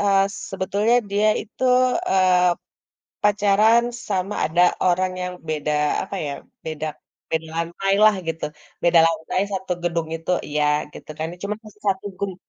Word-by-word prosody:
eee, 195 -1 +4 0.3
sebetulnya 200 +4 +1 0.2
dia 205 +2 +3
itu, 215 +4 -10 0.5
eee, 180 -1 +4 0.7
pacaran 210 +3 +4 0.3
sama 195 +1 -1
ada 165 +3 +2 0.2
orang 185 +1 +2
yang 180 0 -3
beda 150 -1 -1 0.3
apa, 195 - -6
ya, 145 - -3 0.4
beda 155 0 -3 0.5
beda 160 0 -1
lantailah 195 +5 +3
gitu, 165 0 -3 0.4
beda 170 -1 +5
lantai 165 +3 -1
satu 190 -1 -4
gedung 165 -2 -1
itu 165 +2 -4 0.2
iya 150 0 0 0.3
gitu - - -12
kan 160 - -2 0.2
cuma 205 +1 -2
masih 210 0 -15
1 190 0 0
grup, 195 -2 -3
185 Hz, 140 wpm, -22 LUFS, 165-200 Hz, 0.7 s, beda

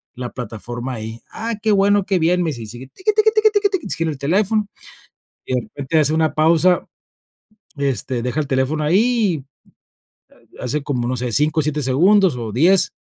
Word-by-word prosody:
la 125 -1 -6
plataforma 120 +1 -6
ahí. 110 0 -6
"Ah, 230 +1 -4
qué 220 - +1
bueno, 200 0 +3
qué 190 -2 +1
bien", 175 +2 +2
me 165 - -1
dice, 120 -4 -7
y 110 - -8
sigue, 120 +4 -9
tiki, 425 +3 -1
tiki, 430 +1 +4
tiki, 430 -2 +3
tiki, 380 -5 -3
sigue 165 - -1
en - - -1
el 145 - -7
teléfono, 200 +8 +1 0.8
y 130 - -2
de 125 - 0
repente 140 +7 -2
hace 150 0 +3
una 160 -1 +1
pausa, 165 +3 +3 0.9
este, 130 -3 -1
deja 125 +5 -2
el 145 - -5
teléfono 135 +3 0
ahí, 195 - +1 1.2
hace 140 +4 -2
como, 125 -4 -2
no 130 - -1
sé, 125 -1 -3
5, 155 +5 +2
7 150 0 -1
segundos, 175 +5 +3
o 115 -3 -5
10 180 - +3
155 Hz, 185 wpm, -19 LUFS, 130-195 Hz, 1.2 s, tiki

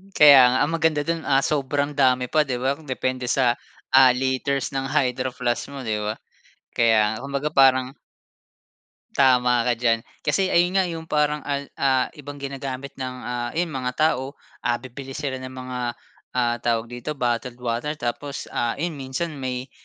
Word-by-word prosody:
Kaya 140 -4 +9
nga 125 +1 +2
ang 145 - 0
maganda 160 -2 +1
dun, 165 0 -3
ah, 135 -1 +3
sobrang 145 0 0
dami 130 -3 +2
pa 155 -2 +3
'di 125 - -1
ba, 135 - +2
depende 130 -3 -3
sa, 125 -1 +3 0.4
ah, 130 -1 +8
liters 130 +1 -1
ng 135 0 -2
Hydroflask 130 -3 -1
mo 140 -2 -8
'di 110 -2 -1
ba? 105 +1 -2 0.6
Kaya 115 -2 +4
nga, 110 - -5
kung 140 0 -7
baga 150 +2 -2
parang 130 -1 +4 1.3
Tama 125 -3 +4
ka 120 -1 0
diyan 115 -2 +2 0.2
kasi 185 +6 0
ayun 175 +2 +3
nga 190 - +4
yung 165 -2 -5
parang 150 -1 +1
al 140 0 -3
ah, 130 -2 +2
ibang 145 0 -8
ginagamit 140 -1 -6
ng, 130 -1 -4
ah, 120 0 -3
ayun 170 -1 0
mga 130 -2 -2
tao, 140 -3 0 0.2
ah, 120 - 0
bibili 130 +2 -9
sila 140 -3 -3
ng 130 0 -8
mga, 130 -1 -6 0.6
ah, 120 -1 +2
tawag 115 0 -1
dito 120 +5 -5
bottled 120 -1 -1
water. 125 +5 -3
Tapos, 140 +2 -4
ah, 120 -1 -1
ayun 170 +4 -2
minsan 135 +5 -3
may, 130 0 -4
130 Hz, 170 wpm, -23 LUFS, 125-145 Hz, 1.3 s, Kaya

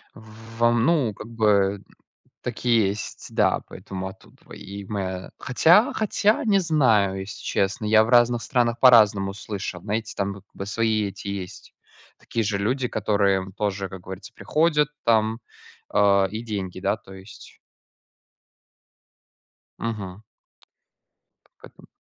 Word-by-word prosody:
В 110 0 -14
вам, 120 0 +3
ну, 140 -10 +2
как 110 - -10
бы, 100 -4 +2 0.6
так - - -6
и - - +1 0.2
есть, 105 +2 -5
да, - - +2
поэтому 95 -1 -7
оттудова 95 - -15
и 100 0 -9
моя. 95 -2 -4
Хотя, 170 - +4
хотя 215 0 +1
не 200 -3 +4
знаю, 115 - +2
если 95 +2 -8
честно. 100 +2 -1
Я 110 +1 +5
в 110 - -4
разных 120 -1 +4
странах 120 0 0
по-разному 105 -6 +5
слышал. 95 -3 -6
Знаете, 110 +2 -3
там 100 0 -2
вот 100 -1 -13
бы 100 - -6
свои 110 0 0
эти, 100 +1 -9
есть 100 0 -7 0.5
такие 115 - -3
же 105 -1 -1
люди, 125 +6 -1
которые 100 -3 0
тоже, 100 -2 -2
как 95 -1 -9
говорится, 95 +5 -10
приходят 150 0 +1
там, 110 0 +2 0.5
а, 100 -1 +4
и 110 +2 -5
деньги. 95 -5 -5
Да, 100 +3 0
то 100 -2 -15
есть. 95 +2 -14 2.2
Мгм. 105 -4 -5 1.4
Поэтому. - - -16
105 Hz, 135 wpm, -24 LUFS, 100-115 Hz, 2.2 s, Я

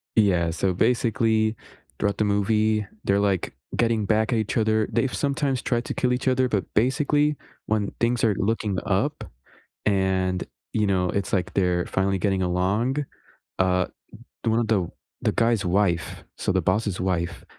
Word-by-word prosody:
Yeah, 90 -6 +3
so, 90 +3 0
basically, 110 0 +2 0.4
throughout 100 -1 0
the 110 - +2
movie, 105 +1 +1 0.2
they're, 100 0 +2
like, 100 -7 0 0.2
getting 115 -3 +1
back 110 +3 +1
at 115 - +2
each 110 +2 -2
other 110 -1 +2
they've 130 - 0
sometimes 140 -2 0
tried 120 -1 -1
to - - -3
kill 125 -1 0
each 125 - -2
other, 130 0 +3
but, 100 -4 0
basically, 145 +5 +2 0.3
when 105 -2 0
things 120 0 +1
are 105 -4 +3
looking 105 -2 -1
up - - 0 0.6
and, 95 -2 +1 0.3
you 105 -2 +1
know, 90 -2 +1
it's 100 +1 -2
like 95 +1 0
they're 90 -2 +1
finally 95 0 0
getting 95 0 0
along, 100 +11 0 0.5
uh, 90 -1 +2 0.6
the 115 - +1
one 115 +1 +2
of 115 - 0
tho 95 -6 0 0.3
the - - +1
guy's 115 -3 +2
wife- 90 -2 0
so - - -1
the 95 -1 +1
boss's 100 +2 0
wife- 90 -2 -2
105 Hz, 165 wpm, -24 LUFS, 95-115 Hz, 0.6 s, Yeah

